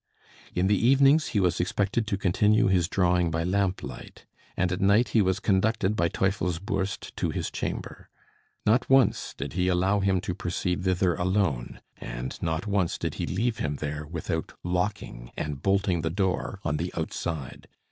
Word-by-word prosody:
In 90 - +2
the 100 +2 +2
evenings, 140 +4 +5
he 105 - 0
was 90 -3 +1
expected 100 +5 0
to 100 - 0
continue 105 +5 +3
his 90 -4 +3
drawing 90 -2 +2
by 80 +1 -1
lamplight; 95 +1 -3 0.3
and 90 -1 +1
at 90 +2 -2
night 100 +4 +4
he 110 0 +3
was 95 0 +1
conducted 105 +1 +1
by 85 -4 +2
Teufelsbürst 95 0 -2
to - - 0
his - - -3
chamber. - - -5 0.6
Not 115 +4 +3
once 135 -5 +3
did 70 +2 -5
he 90 +1 +1
allow 95 +3 +2
him 95 -1 +2
to 95 -2 -3
proceed 90 0 -2
thither 90 -1 +2
alone, 90 -8 -1 0.2
and - - -6
not 80 +2 -1
once 100 -4 0
did - - -3
he - - -1
leave 110 +4 -1
him 75 -1 -1
there 75 +1 -4
without 80 0 -4
locking 90 -9 -2
and 75 -2 -4
bolting 95 -3 +1
the 80 - -1
door 95 +2 -1
on 75 - 0
the 85 +4 -3
outside. 80 -3 -4
95 Hz, 165 wpm, -27 LUFS, 85-100 Hz, 0.6 s, evenings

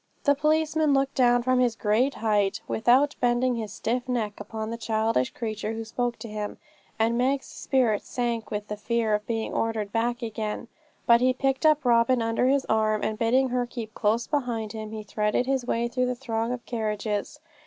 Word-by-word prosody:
The 285 - +5
policeman 310 0 +2
looked 270 0 +1
down 245 -2 +3
from 255 0 +2
his 245 -3 +2
great 230 +6 +1
height, 210 -2 +1
without 255 +6 +3
bending 245 +1 +2
his 220 -4 -4
stiff 245 +3 -2
neck, 220 -4 -2
upon 220 +1 -5
the - - -2
childish 220 - +1
creature 220 -2 -4
who 225 0 -4
spoke 240 +1 -2
to - - -8
him, 210 -1 -5 0.4
and 230 +2 +1
Meg's 265 +2 +1
spirit 245 -6 0
sank 235 -2 -3
with 210 0 -4
the 210 - -5
fear 225 0 0
of 210 0 -1
being 225 -1 -2
ordered 220 -3 -1
back 240 +2 -1
again. 220 +1 -4 0.4
But 235 0 +6
he 255 0 +4
picked 270 +3 +1
up 305 -2 +3
Robin 240 +1 +4
under 230 +2 +1
his 275 0 +2
arm, 215 -1 +1
and 215 0 -2
bidding 255 +3 +3
her 245 0 0
keep 225 -3 -7
close 225 +3 +1
beside 240 -7 -2
him, 220 -1 -6
he 215 0 -6
threaded 210 +3 0
his 265 -2 -1
way 235 0 0
through 250 +1 0
the 250 - -1
throng 230 -2 -2
of 250 -1 -5
carriages. 215 +2 -3
235 Hz, 195 wpm, -26 LUFS, 220-255 Hz, 0.4 s, But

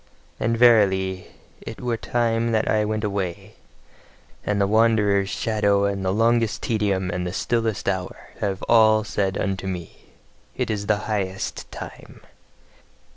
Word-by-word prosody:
And 115 0 0
verily, 95 -6 +3 0.3
it 115 - -8
were 120 -2 -1
time 115 0 0
that 110 0 +1
I 110 -1 +2
went 110 0 -2
away; 100 -4 -3 0.9
and 105 -1 -1
the 100 - +3
wanderer's 105 -2 +3
shadow 100 -3 +1
and 100 -1 -2
the 95 - 0
longest 115 +1 +1
tedium 100 -5 0
and 90 0 -3
the - - -3
stillest 115 +2 -1
hour 95 -2 -3
have 95 -2 -2
all 110 -2 +5
said 100 -2 -1
unto 95 0 -2
me: 90 -3 -7 0.5
"It - - -1
is 105 -1 -3
the 105 -1 +1
highest 95 -3 -3
time!" - - -10
105 Hz, 140 wpm, -23 LUFS, 95-110 Hz, 0.9 s, all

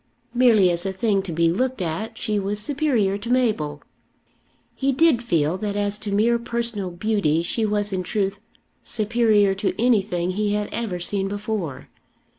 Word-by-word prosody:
Merely 230 -7 +5
as 170 0 0
a 195 - -1
thing 195 +1 +1
to 190 -2 -6
be 165 +1 +2
looked 255 +7 -1
at 195 +7 -3
she 210 -1 -1
was 200 +1 -1
superior 230 -6 0
to 230 +3 -7
Mabel. 210 - 0 0.9
He 275 0 0
did 275 -2 +3
feel 170 -6 0
that 205 -2 -3
as 205 0 -1
to 210 - -5
mere 230 +4 +2
personal 235 -4 -3
beauty 175 -4 0
she 220 +5 -1
was 205 -1 -1
in 185 - -1
truth 195 +2 -2 0.4
superior 215 -2 +2
to 195 +1 -2
anything 195 -7 +1
he 205 +2 0
had 210 0 -1
ever 215 -7 -3
seen 195 +2 -1
before. 205 -7 -4
205 Hz, 165 wpm, -23 LUFS, 190-230 Hz, 0.9 s, Merely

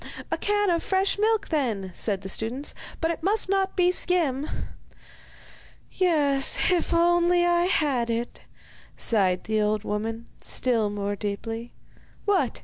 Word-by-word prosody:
'A - - 0
can 415 -2 +1
of 335 -1 +1
fresh 385 +1 0
milk, 435 -1 +1
then,' 225 - -1
said 200 -1 0
the 195 - -7
students; 230 +8 -3 0.3
'but 325 0 +1
it 335 - -5
must 400 +5 +2
not 385 0 0
be 360 -1 +4
skim.' 315 -7 0 1.4
'Yes, 295 -5 +2
if 355 -2 +1
only 345 +1 +3
I 345 0 +3
had 275 -9 +1
it!' 230 +1 -4 0.5
sighed 190 -5 +2
the 215 0 0
old 210 0 0
woman, 225 +3 -3 0.2
still 230 -5 0
more 205 0 -3
deeply. 225 +3 -5 0.5
'What! 405 -2 +1
285 Hz, 140 wpm, -25 LUFS, 220-355 Hz, 1.4 s, be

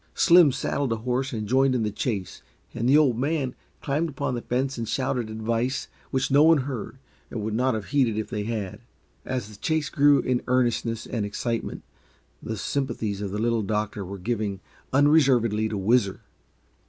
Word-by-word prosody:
Slim 170 -4 +6
saddled 135 0 -2
a - - +2
horse 125 +4 -2
and 110 -3 -4
joined 130 +2 +3
in 120 - +1
the 105 - -1
chase, 100 -4 -3 0.3
and 120 +2 -1
the 145 - +7
Old 130 -7 +3
Man 140 -2 -1 0.3
climbed 150 +4 0
upon 135 -3 -3
the 120 - -3
fence 130 +3 -1
and 115 -2 -4
shouted 125 -4 -1
advice 115 +4 -2 0.2
which 130 0 -1
no 140 +2 +6
one 160 -2 +6
heard 125 -3 -5 0.3
and 110 - -4
would 110 0 -2
not 125 +2 +1
have 110 - -5
heeded 130 -7 +2
if 110 - -2
they 105 -1 -4
had. 105 -3 -4 0.5
As 125 -5 -3
the 105 -1 -13
chase 155 +3 -1
grew 145 0 +5
in 125 -2 0
earnestness 120 -2 0
and 115 -4 -3
excitement, 115 +3 -3 0.6
the 110 - -4
sympathies 110 -4 -2
of 100 - -3
the 100 - -4
Little 115 +1 +1
Doctor 105 0 -2
were 100 +2 -7
given 105 -1 -2 0.3
unreservedly 130 -7 +3
to 105 - -3
Whizzer. 100 0 +2
120 Hz, 180 wpm, -25 LUFS, 110-135 Hz, 0.6 s, the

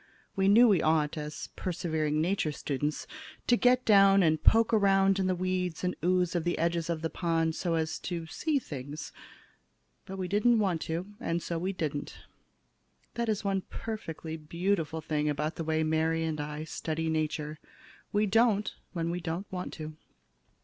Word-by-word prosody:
We 195 0 +2
knew 230 +5 +7
we 195 -7 +4
ought, 155 -2 +2
as 150 -1 -6
persevering 160 -4 -1
Nature 165 -1 +1
students, 145 +1 -2 0.4
to 245 - +5
get 250 +1 +3
down 195 -2 +6
and 155 -2 +2
poke 230 +1 +5
around 195 -2 +4
in 190 - +1
the 185 - +1
weeds 180 -2 -2
and 180 - 0
ooze 180 -1 +2
of 175 -2 0
the 175 +1 0
edges 170 0 0
of 165 -1 -2
the 165 - 0
pond 165 -2 0
so 170 0 -1
as 160 -1 -1
to 170 -2 -4
see 300 - -1
things. 145 - -6 1.0
But 195 - -6
we 185 -1 -2
didn't 220 +5 +3
want 190 -6 +1
to - - -5
do 165 - 0
it, - - -11
and 165 0 -2
so 170 -1 -2
we 185 +3 -1
didn't. 155 -6 -4 1.0
That 235 -1 -2
is 215 -1 0
one 195 -1 0
perfectly 165 -8 -5
beautiful 165 0 -1
thing 150 -1 -1
about 150 +2 -1
the 165 - -2
way 160 0 +1
Mary 160 +1 +1
and 155 -2 -2
I 150 +1 -5
study 160 0 -3
Nature. 155 -1 -2 0.5
We 210 +1 +2
don't 210 -1 +3 0.2
when 170 -1 -1
we 175 - -2
don't 170 +3 -3
want 180 -1 -4
to. 155 -1 -7
170 Hz, 180 wpm, -30 LUFS, 155-195 Hz, 1.0 s, knew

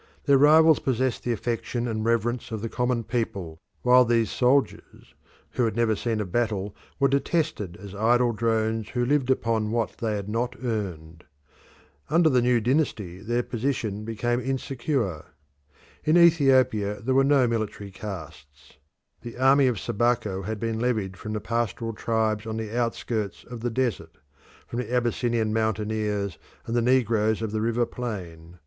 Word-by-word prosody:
Their 140 -2 +5
rivals 155 +2 +6
possessed 130 -1 -1
the 120 - -2
affection 120 +2 -2
and 110 -2 -2
reverence 115 +1 0
of 110 -2 -5
the 115 - -2
common 125 0 -1
people, 100 -9 -3 0.2
while 125 +1 +6
these 115 -2 +1
soldiers, 130 +2 0 0.4
who 125 - 0
had 110 - -1
never 115 -2 +2
seen 115 +1 -2
a 105 - -1
battle, 105 0 -2 0.2
were 140 - +4
detested 135 - -1
as 100 0 -10
idle 120 +4 +3
drones 110 -1 0
who 120 0 -1
lived 135 -1 +1
upon 115 -4 +1
what 115 0 -2
they 110 -2 -1
had 100 -1 -4
not 120 +3 -2
earned. 90 -8 -4 0.8
Under 165 +2 +4
the 125 -1 +3
new 120 0 +3
dynasty 115 - -1
their 120 +4 -1
position 115 -5 -2
became 115 +2 -1
insecure. 130 - -2 0.8
In 155 +3 +4
Ethiopia 130 -11 +4
there 125 +6 -1
was 135 +1 +4
no 140 -3 +4
military 110 -3 -3
caste. 80 -8 -10 0.4
The 120 0 -9
army 135 +1 +5
of 120 -6 0
Sabaco 110 -3 0
had 110 +3 -4
been 115 0 -2
levied 110 -6 -1
from 110 +3 -6
the 105 - -3
pastoral 115 +1 -2
tribes 110 -1 -1
on 110 0 -3
the 110 0 -5
outskirts 115 -3 -2
of 120 -1 -9
the 120 +2 -2
desert, 120 -5 -2 0.5
from 120 - -5
the 125 - -4
Abyssinian 120 -2 0
mountaineers 105 -3 -1 0.3
and 115 - -3
the 120 - +3
negroes 115 -3 +2
of 110 - -3
the 110 0 -1
river 115 +1 +1
plain. 90 -9 -7
115 Hz, 160 wpm, -25 LUFS, 105-125 Hz, 0.8 s, rivals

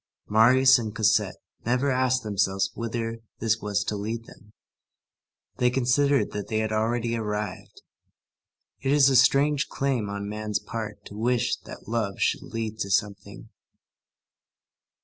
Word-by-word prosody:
Marius 130 +4 +6
and 110 -2 -5
Cosette 110 0 +2 0.3
never 125 +4 +1
asked 130 0 +1
themselves 95 -2 0
whither 115 0 -4 0.2
this 115 0 0
was 105 0 -1
to 105 - -3
lead 110 +3 -4
them. 105 -1 -17 1.1
They 125 -1 +3
considered 135 +3 +2
that 105 -1 -5
they 110 - -2
had 110 0 -1
already 115 +2 0
arrived. 105 -3 -5 1.0
It 135 - -1
is 140 -2 +6
a - - +2
strange 140 +3 +4
claim 130 -7 -1
on 100 0 -4
man's 105 0 -2
part 105 0 -6
to 100 - -10
wish 120 +2 +1
that - - -11
love 110 -4 -2
should - - +1
lead 110 -1 -5
to 100 - -2
something. 100 0 -2
115 Hz, 140 wpm, -26 LUFS, 105-125 Hz, 1.1 s, Marius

